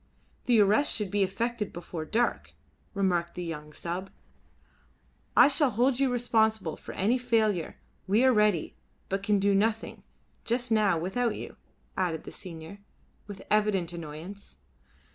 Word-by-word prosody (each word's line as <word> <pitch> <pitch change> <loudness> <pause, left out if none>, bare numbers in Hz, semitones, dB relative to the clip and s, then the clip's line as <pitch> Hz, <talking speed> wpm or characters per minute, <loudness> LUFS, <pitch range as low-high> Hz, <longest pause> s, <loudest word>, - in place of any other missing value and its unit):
"The 240 -3 +5
arrest 210 +8 +4
should 210 -4 -2
be 205 - +1
effected 210 +3 -1
before 170 -2 -6
dark," 235 +8 -1 0.4
remarked 175 -3 0
the 180 - -4
young 150 -3 -6
sub. 175 +5 -5 1.3
"I 245 - +9
shall 285 0 +2
hold 245 +3 +1
you 270 -2 +2
responsible 220 -7 +1
for - - -10
any 230 +7 +1
failure. 220 -8 0 0.3
We 210 +6 +3
are 260 -1 +5
ready, 210 -7 +2 0.3
but 195 +1 -1
can 205 +1 +2
do 200 +1 +2
nothing 220 +3 0 0.4
just 240 +1 -1
now 210 -5 +3
without 205 +8 -1
you," - - -8 0.4
added 175 -4 -1
the - - -9
senior, 170 +1 -10 0.5
with 200 -2 -9
evident 205 -5 +2
annoyance. 170 - -8
205 Hz, 145 wpm, -28 LUFS, 175-230 Hz, 1.3 s, I